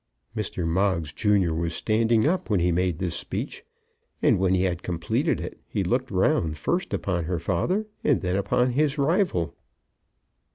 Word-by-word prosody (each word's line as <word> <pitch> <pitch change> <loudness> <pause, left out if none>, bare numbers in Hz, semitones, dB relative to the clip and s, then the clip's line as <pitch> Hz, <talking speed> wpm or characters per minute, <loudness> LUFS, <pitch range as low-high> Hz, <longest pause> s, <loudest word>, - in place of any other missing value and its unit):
Mr. 85 - -2
Moggs 85 -3 0
junior 100 -6 +2
was 85 +1 -2
standing 115 0 +2
up 180 -1 0
when 105 -4 +2
he 90 +1 +2
made 90 -1 +1
this 90 -2 -2
speech, - - -4 0.6
and, - - +3
when 95 0 +3
he 90 - +2
had 90 -2 -1
completed 85 -2 -1
it, - - -7
he - - -1
looked - - 0
round, 80 -3 +1
first 175 - -1
upon 85 -4 -1
her 90 +1 -1
father 95 - 0 0.2
and 145 - +3
then 90 0 -1
upon 125 +6 +1
his 145 +3 +1
rival. 150 - +1
95 Hz, 165 wpm, -25 LUFS, 85-120 Hz, 0.6 s, and